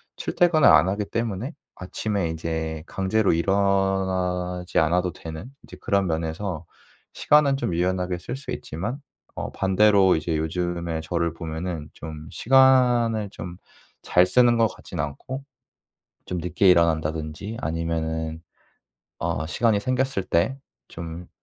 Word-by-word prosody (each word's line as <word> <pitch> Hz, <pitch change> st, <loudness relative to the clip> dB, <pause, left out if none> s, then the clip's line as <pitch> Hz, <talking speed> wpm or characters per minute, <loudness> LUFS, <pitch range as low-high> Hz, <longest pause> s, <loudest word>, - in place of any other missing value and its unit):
출퇴근을 170 Hz, -5 st, +3 dB
안 90 Hz, -, +6 dB
하기 100 Hz, +2 st, -1 dB
때문에 115 Hz, -, -3 dB, 0.2 s
아침에 95 Hz, -1 st, -2 dB
이제 80 Hz, -1 st, -3 dB
강제로 95 Hz, +2 st, +1 dB
일어나지 95 Hz, -1 st, 0 dB
않아도 90 Hz, +2 st, +1 dB
되는 80 Hz, +8 st, -8 dB
이제 115 Hz, -, -12 dB
그런 100 Hz, -4 st, +1 dB
면에서 80 Hz, +1 st, -3 dB, 0.5 s
시간은 145 Hz, -2 st, +4 dB
좀 115 Hz, -, -2 dB
유연하게 90 Hz, +1 st, 0 dB
쓸 90 Hz, +8 st, -6 dB
수 135 Hz, -, -8 dB
있지만 105 Hz, -, -4 dB, 0.4 s
어 -, -, -4 dB
반대로 95 Hz, -1 st, +4 dB
이제 80 Hz, +1 st, -1 dB
요즘에 85 Hz, 0 st, -2 dB
저를 85 Hz, 0 st, -1 dB
보면은 80 Hz, -1 st, -5 dB
좀 80 Hz, 0 st, -9 dB
시간을 125 Hz, -4 st, +4 dB
좀 85 Hz, 0 st, -8 dB, 0.4 s
잘 90 Hz, 0 st, +4 dB
쓰는 120 Hz, +5 st, +4 dB
것 115 Hz, -1 st, +4 dB
같진 90 Hz, -, -10 dB
않고 125 Hz, -, -5 dB, 0.8 s
좀 90 Hz, -, -4 dB
늦게 90 Hz, +2 st, +3 dB
일어난다든지 80 Hz, +4 st, 0 dB
아니면은 80 Hz, 0 st, -2 dB, 0.8 s
어 -, -, -2 dB
시간이 110 Hz, +4 st, +2 dB
생겼을 130 Hz, -1 st, 0 dB
때 95 Hz, +13 st, +1 dB, 0.3 s
좀 85 Hz, +1 st, -8 dB
90 Hz, 270 characters per minute, -24 LUFS, 80-105 Hz, 0.8 s, 안